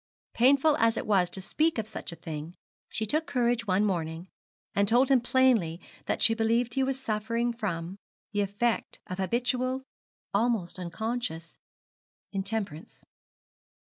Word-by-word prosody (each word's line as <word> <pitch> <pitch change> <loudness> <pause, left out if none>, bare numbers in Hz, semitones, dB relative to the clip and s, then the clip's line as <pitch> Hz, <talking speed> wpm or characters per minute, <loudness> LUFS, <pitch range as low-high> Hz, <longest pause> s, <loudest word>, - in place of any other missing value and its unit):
Painful 275 +5 +5
as 230 -3 +3
it - - -2
was 190 -4 +3
to 190 - -6
speak 310 - +1
of 220 -1 -2
such 215 - -6
a - - -7
thing, 160 +1 -7 0.3
she 220 - -1
took 310 +9 0
courage 240 -4 +1
one 195 +2 +3
morning, 165 -2 -2 0.5
and 200 0 +2
told 245 +5 +4
him 260 -3 +5
plainly 240 -10 +3 0.3
that - - 0
she 225 - +7
believed 230 +1 +1
he 270 - +1
was 265 0 0
suffering 230 0 -1
from, 190 -4 -4 0.3
the 205 0 0
effect 205 +4 -1
of 185 -2 -6
habitual 250 +6 0 0.5
almost 205 -4 0
unconscious 180 -2 -4 0.8
intemperance. 195 -5 -4
220 Hz, 140 wpm, -28 LUFS, 185-245 Hz, 0.8 s, she